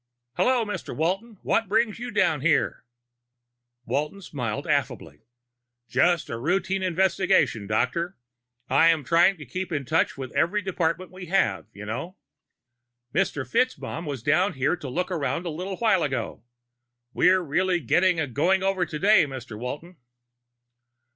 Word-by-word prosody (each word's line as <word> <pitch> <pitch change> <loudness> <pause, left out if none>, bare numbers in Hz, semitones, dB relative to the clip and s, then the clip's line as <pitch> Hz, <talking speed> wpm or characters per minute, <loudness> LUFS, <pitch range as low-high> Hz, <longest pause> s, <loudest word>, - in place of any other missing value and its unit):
"Hello, 250 - +2
Mr. 210 - -5
Walton. 195 +8 -1
What 225 - +1
brings 220 +2 +1
you 245 +1 -5
down 160 - +1
here?" 155 0 +1 1.0
Walton 150 +7 -2
smiled 120 -10 -4
affably. - - -2 0.7
"Just 170 +7 +2
a 115 - -5
routine 190 +7 0
investigation, 185 - +2
Doctor. 140 - -1 0.5
I 165 0 +4
try 170 +6 +4
to 155 -5 -11
keep 185 +8 -5
in 145 -4 -2
touch 120 - +1
with 130 -1 -7
every 180 +9 +1
department 180 -1 -2
we 185 -1 -9
have, 105 - +1
you 105 +1 -10
know." 165 - -5 1.0
"Mr. 150 -6 0
FitzMaugham 170 - -1
was 135 -6 -5
down 185 +7 +2
here 140 +4 +1
to 150 -6 -8
look 180 +8 -2
around 165 +1 -2
a 170 - -2
little 185 +4 -5
while 215 -6 +3
ago. 130 -7 -3 0.7
We're 185 +1 +4
really 175 +3 +1
getting 175 +5 +2
a 160 - +1
going 175 +9 +1
over 190 -3 +1
today, 190 +3 +4
Mr. 130 -4 -8
Walton!" 150 +10 -7
170 Hz, 140 wpm, -25 LUFS, 140-190 Hz, 1.0 s, I